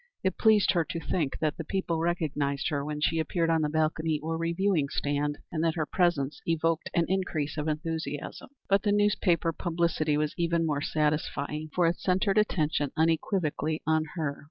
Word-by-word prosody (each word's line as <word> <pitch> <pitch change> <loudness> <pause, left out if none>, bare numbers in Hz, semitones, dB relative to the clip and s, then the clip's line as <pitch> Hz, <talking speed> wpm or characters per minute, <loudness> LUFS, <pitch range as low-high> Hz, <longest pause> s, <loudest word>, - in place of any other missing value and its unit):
It 190 - -1
pleased 215 -2 +5
her 170 -2 +2
to 165 +2 -5
think 155 -3 -1
that 155 0 0
the 165 - -4
people 170 -1 -2
recognized 150 -5 -1
her 145 -3 -1
when 150 0 -4
she 165 +1 +2
appeared 165 +1 0
on 165 -1 +2
the 150 - +1
balcony 155 0 0
or 160 +2 -3
reviewing 165 -2 +1
stand, 145 +1 -1
and 160 -2 -1
that 165 0 +1
her 160 -2 0
presence 150 -5 0
evoked 165 0 0
an 170 - +3
increase 170 -6 -1
of 150 0 -3
enthusiasm. 155 0 -4 0.2
But 195 0 +3
the 205 - +1
newspaper 195 -5 +2
publicity 165 -3 0
was 150 0 0
even 170 -1 +1
more 145 -2 0
satisfying, 150 0 -1
for 180 - +3
it 170 +1 +1
centred 190 +2 +2
attention 155 -8 0
unequivocally 160 -1 0
on 160 0 +2
her. 150 -4 -2
160 Hz, 180 wpm, -28 LUFS, 150-170 Hz, 0.2 s, pleased